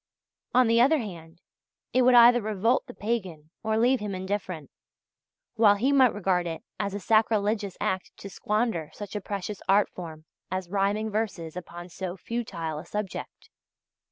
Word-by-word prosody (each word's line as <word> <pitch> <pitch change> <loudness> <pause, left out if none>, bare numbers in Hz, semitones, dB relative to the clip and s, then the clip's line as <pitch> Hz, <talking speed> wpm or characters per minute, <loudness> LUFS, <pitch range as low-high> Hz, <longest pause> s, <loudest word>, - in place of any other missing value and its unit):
On 255 0 +6
the 230 +1 +4
other 290 +6 +5
hand, 175 - -8 0.5
it 255 - +4
would 250 0 +5
either 240 0 +8
revolt 215 +5 +1
the 245 - -9
pagan 185 -9 -3
or 220 0 0
leave 245 +3 +3
him 205 -2 -4
indifferent, 185 -5 -4 0.9
while 210 -2 +6
he 250 +7 +1
might 260 -4 +5
regard 185 -3 0
it 165 -1 -5 0.2
as 200 0 -2
a - - -3
sacrilegious 210 -1 +1
act 190 0 -2
to - - -8
squander 210 -5 -1
such 205 0 -8
a 210 - -2
precious 200 +1 -5
art 200 +1 +4
form 160 -3 -9 0.2
as 185 0 -4
rhyming 205 +2 0
verses 190 -7 -3
upon 175 -1 -8
so 180 +1 -6
futile 170 -8 -4
a - - -9
subject. 210 -2 -6
205 Hz, 160 wpm, -27 LUFS, 180-225 Hz, 0.9 s, either